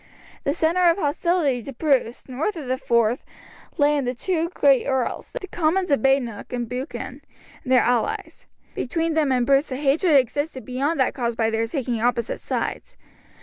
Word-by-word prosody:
The 280 - +2
centre 345 +2 +3
of 335 - +2
hostility 300 -4 +1
to 275 +4 -8
Bruce, 260 -4 0
north 285 +11 -2
of 300 - -6
the 255 +1 -1
Forth, 235 +1 +1 0.5
lay 295 -1 +4
in 280 -3 0
the 250 +1 -2
two 335 +4 -1
great 280 -7 +3
earls, 265 -2 -2
the 380 - -8
Comyns 360 0 0
of 280 - +3
Badenoch 265 -5 0
and 240 -1 -3
Buchan, 250 +5 -6 0.4
and 255 - -6
their 255 - +6
allies. 240 -2 -1 0.3
Between 330 +5 -1
them 305 -3 +2
and 250 -2 +2
Bruce 275 +2 +2
a - - -1
hatred 295 +4 +2
existed 275 +1 0
beyond 275 +5 -1
that 260 - +2
caused 235 -3 -2
by 225 -1 +1
their 225 +1 0
taking 240 -3 -2
opposite 235 -1 0
sides. - - -4
270 Hz, 180 wpm, -23 LUFS, 245-315 Hz, 0.5 s, their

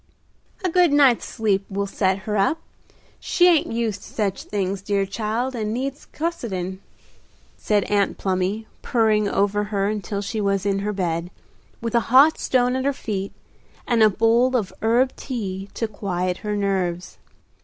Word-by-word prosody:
"A - - +2
good 355 -2 +4
night's 275 -5 +4
sleep 205 -4 0
will 200 0 -2
set 190 -1 0
her 210 - -2
up. 200 +11 +2 0.6
She 355 - +3
ain't 335 -8 +3
used 230 -3 -2
to - - -12
such 200 -3 -2
things, 195 -1 -2
dear 200 0 0
child, 225 +6 -2
and 215 -3 -2
needs 275 +5 -4
cossetin'," 195 - -3 0.8
said 205 -2 +1
Aunt 200 -1 0
Plumy, 190 +3 -1 0.2
purring 215 -3 +2
over 205 +1 +1
her 200 -2 -1
until 205 -1 -3
she 215 +2 -3
was 195 -1 0
in 195 -1 +1
her 205 +1 -2
bed, 175 -3 -2 0.5
with 230 -1 -3
a 235 - +5
hot 275 +6 +6
stone 250 0 +2
at 260 - -1
her 280 - +2
feet 200 -6 -4 0.6
and 235 -4 +2
a 215 - +7
bowl 230 +5 +3
of 205 -5 -3
herb 240 +4 +2
tea 200 -6 -5
to 225 - -1
quiet 185 -4 -2
her 210 -1 -3
nerves. 185 -3 -2
210 Hz, 165 wpm, -23 LUFS, 195-235 Hz, 0.8 s, a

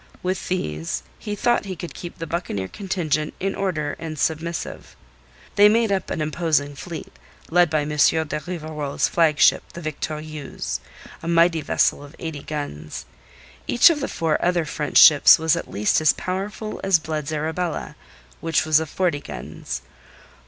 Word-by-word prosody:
With 185 0 -2
these 80 - -2 0.2
he 210 -2 -4
thought 240 +1 +1
he 190 -1 -5
could 175 0 -7
keep 175 - -8
the 165 - -5
buccaneer 160 - -3
contingent 160 - -2
in 195 +1 -1
order 155 -7 -2
and 160 -1 -6
submissive. 160 +3 -3 0.6
They 205 +1 +8
made 225 0 +2
up 195 -1 -1
an - - -2
imposing 155 -2 0
fleet, 165 +4 -8 0.4
led 175 0 +5
by 155 -1 +1
M. 145 - -4
de 150 +1 +4 0.2
Rivarol's 155 -4 -3
flagship, 160 -3 +4
the 170 - -8
Victorieuse, 155 - -5 0.4
a 165 - -7
mighty 170 -1 +4
vessel 145 - +1
of 145 +2 -13
eighty 160 -4 -5
guns. 110 - -6 0.6
Each 245 +7 +6
of 310 - -1
the 275 - -2
four 160 -2 -1
other 175 -2 +2
French 150 -1 -1
ships 150 -3 +9
was 160 0 +2
at 170 - -5
least 105 +8 +1
as 155 - +5
powerful 200 +3 -4
as 195 -2 +4
Blood's 155 -1 -4
Arabella, 160 +2 -3 0.4
which 165 -1 +1
was 155 -1 +5
of 160 -1 -4
forty 175 -5 0
guns. 65 - -7
160 Hz, 160 wpm, -23 LUFS, 150-180 Hz, 0.6 s, ships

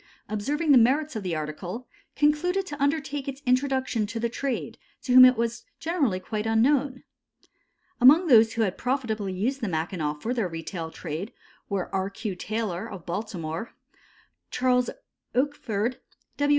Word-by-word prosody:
observing 290 +10 0
the 265 - +8
merits 275 +5 +2
of 215 - -2
the 180 -4 -2
article, 175 +10 -5 0.3
concluded 305 +7 +2
to 290 -5 -7
undertake 285 -1 -1
its 275 +1 -6
introduction 255 -3 +1
to 230 +2 -4
the 235 +1 0
trade, 260 +1 -3 0.2
to 250 - -2
whom 255 0 +11
it 255 -1 +7
was 235 +1 -2 0.2
generally 290 - 0
quite 210 +3 -4
unknown. 260 +4 +2 1.0
Among 295 +9 +7
those 225 -7 +6
who 230 - +1
had 195 - +1
used - - -21
profitably 220 -5 -1
the 270 -5 -5
Mackinaw 160 -2 -2
for 220 +11 -3
their 230 -6 0
retail 165 0 -5
trade 165 +5 -6 0.4
were 200 -2 -3
R. 190 0 0
Q. 200 -1 -5
Taylor, 205 -2 -3
of 190 -4 -9
Baltimore, 175 0 -4 0.7
Charles 250 -1 +2 0.5
Oakford, 250 -4 -1 0.4
W. 290 0 +1
230 Hz, 150 wpm, -26 LUFS, 195-270 Hz, 1.0 s, whom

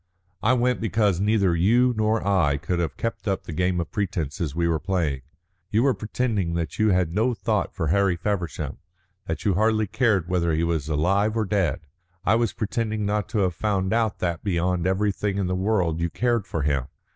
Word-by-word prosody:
"I 120 - +3
went 125 0 +1
because 105 -4 +1
neither 100 -3 +2
you 120 +9 +3
nor 110 -1 0
I 85 -8 +3
could 85 +5 -2
have 80 -5 -2
kept 115 -1 -4
up 95 -1 0
the 80 - -7
game 90 +2 0
of 85 - -4
pretences 85 -7 -2
we 85 0 +1
were 80 -2 +1
playing. 80 -8 -1 0.5
You 110 +3 +2
were 135 -1 +4
pretending 105 -7 -1
that 85 -2 -3
you 110 0 +4
had 90 -4 +1
no 115 +5 +1
thought 110 -3 -1
for 80 -6 -1
Harry 95 +1 +3
Feversham, 85 -6 -3 0.5
that 80 -1 -4
you 100 - +3
hardly 110 +3 +2
cared 100 -6 +1
whether 85 -2 +1
he 80 +2 +1
was 80 -3 -1
alive 100 +8 +1
or 110 - +1
dead. 95 -9 0 0.4
I 100 - +4
was 115 -1 +2
pretending 110 -1 -2
not 105 0 -1
to 110 -4 0
have 90 -2 +1
found 95 +1 -1
out 115 -2 +1
that 85 -3 -2
beyond 90 -2 0
everything 100 +1 0
in 100 - 0
the 90 - -1
world 90 -4 0
you 85 0 0
cared 120 0 0
for 80 - -2
him. 70 -3 0
95 Hz, 200 wpm, -24 LUFS, 85-110 Hz, 0.5 s, were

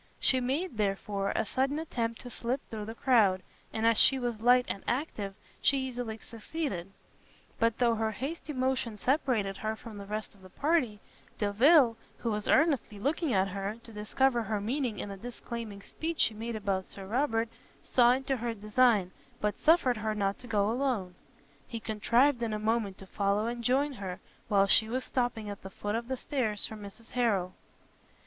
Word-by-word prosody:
She 260 - +4
made, 265 +3 -1
therefore, 200 -1 -1
a 225 - +1
sudden 270 +6 0
attempt 235 -8 -3
to 245 - -8
slip 245 +4 -1
through 215 -2 -6
the 225 +1 -7
crowd, 215 -8 +3 0.3
and 220 0 -1
as 230 -1 +5
she 270 - +6
was 240 -4 -3
light 250 +1 +5
and 195 - -4
active, 225 -7 -2 0.3
she 280 - +4
easily 245 -4 -3
succeeded; 225 - -4 0.7
but 230 -1 +2
though 240 -2 +3
her 220 0 0
hasty 295 +8 -5
motion 255 -4 -1
separated 245 -6 +1
her 220 0 -2
from 220 -2 -10
the 200 - -8
rest 215 0 -4
of 200 - -21
her 185 - -13
party, 250 - 0 0.4
Delvile, 230 +4 +5 0.2
who 230 - -2
was 210 -1 -2
earnestly 275 -8 +3
looking 295 - 0
at 195 -2 +2
her, 200 +3 -3
to 230 - -11
discover 240 +4 +1
her 215 -1 -1
meaning 240 +1 -1
in 205 - -5
the 195 - -6
disclaiming 230 -2 -7
speech 325 0 -4
she 225 - +4
made 225 +2 -4
about 195 -3 -1
Sir 195 - -9
Robert, 225 +1 +1 0.4
saw 245 -1 +5
into 265 +1 -1
her 235 -1 -3
design, 215 -2 +3 0.3
but 210 -1 -1
suffered 290 -7 +4
her 215 0 -2
not 200 -1 0
to 250 - -11
go 205 -3 +2
alone; 235 -8 -1 0.5
he 230 - -5
contrived 235 +5 +2
in 225 -2 -1
a - - 0
moment 215 -2 0
to 195 - -11
follow 200 +2 0
and 235 0 -3
join 275 +4 +2
her, 190 -6 -6 0.3
while 200 -2 +4
she 220 +2 +5
was 255 +2 -1
stopping 240 -5 -1
at 205 -1 -6
the 190 - -8
foot 205 +2 -4
of 230 +1 -2
the 260 0 -2
stairs 225 -7 -1
for 220 - -6
Mrs 210 +2 -11
Harrel. 200 -7 +1
230 Hz, 185 wpm, -30 LUFS, 205-255 Hz, 0.7 s, she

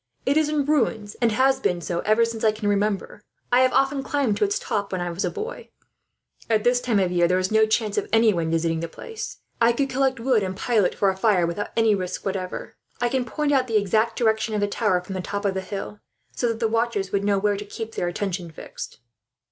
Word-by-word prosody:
It 275 - +2
is 310 -1 +3
in 300 -2 0
ruins, 230 -8 0
and 235 -1 +3
has 265 +4 +3
been 175 - 0
so 170 +1 -3
ever 215 +4 +3
since 230 -1 -5
I 220 - +5
can 215 -1 -4
remember. 205 0 -1 0.3
I 245 - +5
have 255 - +4
often 270 +1 +2
climbed 275 -5 0
to - - +1
its 405 0 +1
top, 200 -1 -3
when 185 - -2
I 175 0 -2
was 170 +3 -3
a - - 0
boy. 455 +2 -6 0.8
At 215 -2 +2
this 245 0 +3
time 235 -4 +1
of 185 -2 +2
year, 175 -1 +3
there 180 +1 +2
is 185 +1 -1
no 220 0 +4
chance 215 -1 +1
of - - -6
anyone 215 -8 +3
visiting 165 0 0
the 170 - -3
place. 450 - -7 0.2
I 235 +1 +5
could 275 +2 -1
collect 265 -1 +1
wood 240 -2 +2
and 190 -1 -3
pile 220 -2 +2
it, - - +3
ready - - -12
for 195 -1 +2
a - - -6
fire, 190 -3 +3
without 170 +5 -3
any 225 -1 +4
risk 185 -2 -3
whatever. 190 -2 -4 0.2
I 240 - +1
can 255 0 0
point 295 +5 -1
out 260 -2 +2
the 225 -2 +2
exact 215 +3 +1
direction 220 -1 +1
of - - 0
the 205 - +2
tower 205 -3 +1
from 185 +2 -8
the 185 - -3
top 200 +2 -4
of 195 - +2
the 190 - -2
hill, 200 +2 -6 0.4
so 245 - 0
that 230 -1 -2
the 230 - +2
watchers 225 -4 -1
would 200 0 0
know 200 -1 +2
where 205 +1 +1
to 200 - -5
keep 225 +2 -7
their 175 - -1
attention 180 -1 -3
fixed." 155 - -9
215 Hz, 250 wpm, -24 LUFS, 190-240 Hz, 0.8 s, I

